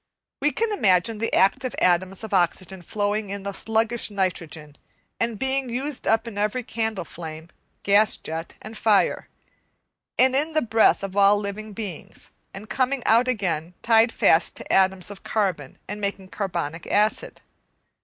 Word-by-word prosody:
We 295 - +3
can 445 +8 -1
imagine 210 - +2
the 230 - -1
active 255 +7 +2
atoms 185 +3 +1
of 220 -1 -6
oxygen 185 +1 0
floating 205 +3 -2
in 200 0 -5
the 200 0 -4
sluggish 225 +3 0
nitrogen, 170 -6 -3 0.4
and 230 -1 -1
being 265 +1 -1
used 260 +3 -3
up 225 +1 +2
in 205 -3 -6
every 215 +5 0
candle 220 -6 -3
flame, 160 0 -8 0.3
gas 205 +1 +4
jet 165 +1 -6
and 215 +1 -9
fire, 215 -2 +2 0.9
and 260 +1 +4
in 305 +4 +1
the 310 - +3
breath 225 -3 +3
of 195 -1 -5
all 200 0 +5
living 205 +1 -5
beings; 200 -6 -8 0.2
and 200 +3 -10
coming 260 +1 0
out 235 +3 +4
again 180 -8 -2
tied 225 0 +4
fast 165 -6 +3
to - - -5
atoms 190 0 +2
of 200 - -10
carbon 185 -11 -2
and 205 +1 -6
making 200 -1 -4
carbonic 170 -6 -4
acid. 215 - 0
205 Hz, 155 wpm, -24 LUFS, 185-230 Hz, 0.9 s, all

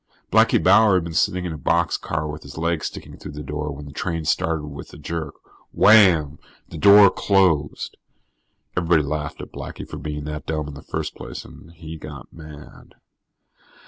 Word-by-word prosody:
Blackie - - +5
Bauer 110 -3 +5
had 90 - +2
been 85 -1 -6
sitting 90 +3 +1
in 85 - -3
a 80 - -8
boxcar 80 -2 0
with 75 +1 -7
his - - -12
legs 85 0 -1
sticking - - -10
through 75 - -9
the 75 +1 -7
door 75 +1 -4
when 70 +1 -8
the 70 - -10
train 85 +1 -3
started 80 -2 0
with 70 -1 -9
a - - -10
jerk. 80 -3 -5 0.4
Wham, 90 -9 +5 0.3
the - - -9
door 100 -1 +8
closed. 90 -7 +1 0.8
Everybody 85 -3 +2
laughed 75 +1 -4
at - - -10
Blackie - - -8
for - - -8
being 75 -1 -5
that 75 0 -6
dumb 75 -2 -2
in 75 - -8
the 70 - -10
first - - -4
place, - - -8
and 80 - -14
he 80 -1 -9
got 70 -4 -10
mad. 75 -2 -13
80 Hz, 180 wpm, -22 LUFS, 75-85 Hz, 0.8 s, door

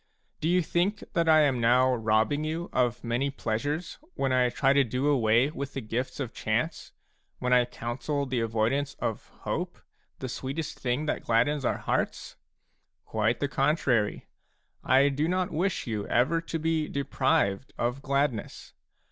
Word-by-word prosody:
Do 160 - 0
you 180 0 +3
think 185 +6 0
that 165 -1 +2
I 155 -1 +7
am 135 -5 +2
now 125 +2 +4
robbing 110 +5 +1
you 160 +3 -3
of 120 -1 +1
many 120 +4 0
pleasures 145 +7 -3 0.2
when 135 -1 0
I 125 -1 +3
try 135 +2 +2
to 140 0 +5
do 125 +3 -2
away 125 -1 +3
with 140 -2 -5
the - - -1
gifts 120 +5 -3
of 125 -5 -4
chance, 120 +10 -2 0.5
when 125 0 0
I 125 -1 +5
counsel 125 +4 -3
the 130 -2 -1
avoidance 115 +5 0
of - - -4
hope, - - -3 0.4
the 130 - -5
sweetest 135 +5 -5
thing 125 +4 -1
that - - -1
gladdens 130 +5 +1
our - - +1
hearts? - - -2 0.7
Quite 110 +2 0
the 145 - +1
contrary; 135 -7 +1 0.6
I 135 +3 +5
do 145 +3 0
not 180 +1 0
wish 175 +4 -1
you 105 -3 -3
ever 155 +8 +2
to 165 0 -4
be 160 -1 0
deprived 130 -6 0
of 125 +3 -1
gladness. 140 -4 -2
135 Hz, 160 wpm, -28 LUFS, 120-150 Hz, 0.7 s, I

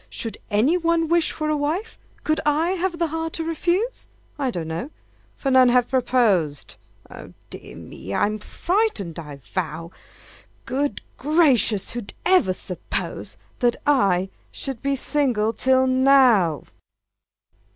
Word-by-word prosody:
Should 225 - -3
any 230 +11 +3
one 335 -2 +1
wish 340 -1 +3
for 310 - -3
a 305 - +1
wife, 315 +10 -3 0.2
Could 310 0 +1
I 305 +3 +1
have 370 -2 -1
the 335 - +1
heart 325 +1 -3
to 325 - -3
refuse? 345 +8 -1 0.3
I 270 -2 0
don't 170 -9 -4
know 165 - -4 0.5
for 270 - -2
none 260 -1 +6
have 245 0 +3
proposed 225 - +1 0.4
Oh, - - -11 0.2
dear - - -9
me! 95 - -10
I'm 210 - 0
frightened, 330 - -1
I 150 -3 -8
vow! 160 +6 -5 0.7
Good 275 -3 -2
gracious! 270 - +3
who 240 -4 -6 0.2
ever 365 - +4
supposed 180 -1 -5 0.2
That 240 -2 +2
I 195 -10 +2 0.2
should 265 -4 -5
be 275 0 0
single 250 -6 0
till 260 +3 +3
now? 255 - +4
260 Hz, 135 wpm, -23 LUFS, 205-315 Hz, 0.7 s, none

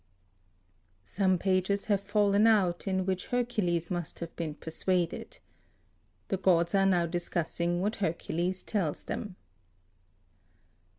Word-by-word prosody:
(Some 185 - +1
pages 190 +2 +1
have 200 -2 +1
fallen 205 +1 +3
out, 195 -5 +2
in 190 -1 0
which 185 -1 -2
Hercules 210 -9 0
must 175 -3 -3
have 170 -1 -7
been 160 -3 -4
persuaded. 170 +2 -2 0.9
The 195 - 0
gods 170 -2 +3
are 195 -1 +4
now 175 -3 +3
discussing 175 0 -1
what 210 +2 -1
Hercules 175 0 -2
tells 185 -9 -2
them). 205 -4 -5
185 Hz, 115 wpm, -30 LUFS, 170-200 Hz, 0.9 s, are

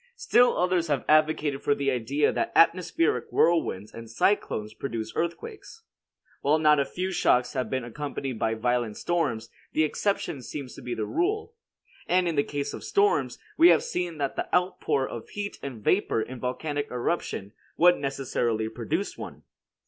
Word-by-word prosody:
Still 250 - +3
others 180 -2 +1
have 145 -4 -1
advocated 155 -2 +2 0.2
the 140 -1 +1
idea 130 +4 +1
that - - -1
atmospheric 165 -1 +3
whirlwinds 160 - +1
and 115 0 -9
cyclones 110 - 0
produce 110 -2 -5
earthquakes. 425 - -5 0.6
While 145 +3 +3
not 150 -1 +4
a 140 - +2
few 185 +5 -3
shocks 125 -8 +2
have 130 -2 -2
been 130 -2 -2
accompanied 135 -1 -5
by 115 0 0
violent 120 -1 -1
storms, 150 -11 -1 0.2
the 155 - +3
exception 155 -3 -1
seems 130 +2 -7
to - - -11
be 125 - -4
the 110 - -2
rule. 425 - -1 0.5
And 180 0 +2
in 170 - 0
the 145 - +3
case 145 -1 -4
of - - -7
storms, 410 0 +1 0.2
we 335 - +9
have 445 - +5
seen 180 - -3
that 140 -2 -2
the - - -4
outpour 180 -7 +1
of 115 - -8
heat 205 0 -5
and 125 -6 -7
vapor 180 - +2
in 130 - -8
a - - -16
volcanic 145 +3 -3
eruption 120 - -3 0.2
would 175 +1 +6
necessarily 120 -5 -1
produce 110 - -3
one. - - -8
145 Hz, 165 wpm, -27 LUFS, 125-175 Hz, 0.6 s, we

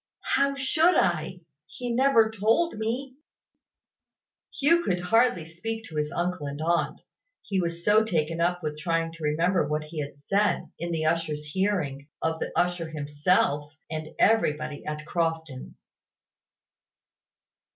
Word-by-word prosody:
"How 275 +1 +3
should 315 +6 +3
I? 175 0 +1 0.3
He 245 -1 -5
never 235 -3 +4
told 225 - +1
me." 255 +4 -3 1.4
Hugh 335 +5 +4
could 180 - 0
hardly 205 -1 +2
speak 220 +8 -5
to 160 - -8
his 150 0 -1
uncle 175 -4 -2
and 140 +1 -5
aunt, 170 +2 0 0.4
he 195 -2 -1
was 170 0 -4
so 215 +1 +5
taken 165 -5 -1
up 175 0 +1
with 150 -1 -3
trying 165 +1 0
to 165 -1 -11
remember 165 +3 +2
what 150 +1 -1
he 155 +1 -7
had 145 -1 -5
said, 195 +5 0
in 170 0 -3
the 160 -1 -1
usher's 155 -2 0
hearing, 150 -5 -1
of 160 0 -1
the - - -3
usher 175 -2 0
himself, 145 0 +1 0.2
and 155 -1 -4
everybody 155 -9 +2
at 150 0 -4
Crofton. 160 -5 -3
170 Hz, 140 wpm, -27 LUFS, 155-215 Hz, 1.4 s, so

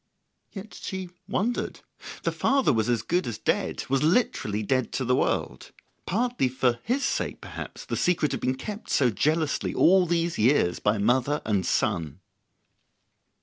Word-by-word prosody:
Yet 205 +1 -9
she 190 -2 -6 0.2
wondered. 235 +4 -2 0.4
The - - +1
father 270 - +2
was 110 0 0
as 120 -2 +1
good 175 +1 0
as 115 - -4
dead, - - -1
was 135 0 +1
literally 150 - +1
dead 130 +2 0
to 130 - -1
the 125 +1 +3
world; - - -1 0.4
partly 240 - +1
for 125 -2 +1
his 270 +3 0
sake, 270 - -2
perhaps, - - -8
the - - -3
secret 160 -5 +1
had 135 - -3
been 130 +1 0
kept 210 +11 -7
so 125 -4 +3
jealously 155 - 0
all 185 +1 +5
these 170 0 0
years 110 -6 +3
by 105 +1 +1
mother 130 +7 +2
and 100 -4 0
son. 85 -7 0
135 Hz, 155 wpm, -26 LUFS, 115-180 Hz, 0.4 s, all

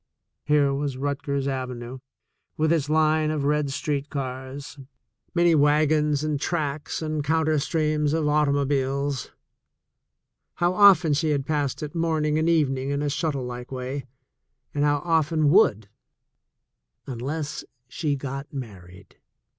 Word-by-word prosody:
Here 150 -2 +3
s 140 -3 -2
Rutgers 140 0 -2
Avenue, 130 -2 -4 0.6
with 155 +1 +2
its 150 -3 0
line 155 0 +3
of 155 -2 -1
red 150 0 +1
street 145 0 -2
cars, 135 +1 -6 0.6
nv 170 -1 +5
wagons 150 0 +3
and 150 -2 -1
tracks 155 -2 -2
and 155 -1 -2
counter 155 0 +1
streams 150 0 0
of 160 0 0
autL 145 -1 +2
ibiles 140 -1 -1 0.6
— - - -57
how 175 +1 +1
often 190 -5 +6
had 145 - +2
she 155 -2 +1
passed 145 0 -2
it 150 - -6
morning 155 -2 0
and 160 +1 +1
evening 135 -5 +1
in 140 +1 -1
a 145 - 0
snuttle 140 -4 -2
like 125 0 -7
way, 130 +1 -5 0.7
and 145 - 0
how 145 0 +1
often 160 -2 +2
would, 110 - +4 1.2
unless 145 +5 -4 0.2
she 145 +3 -2
got 140 +1 -6
married! 95 -8 -10
145 Hz, 135 wpm, -25 LUFS, 135-155 Hz, 1.2 s, often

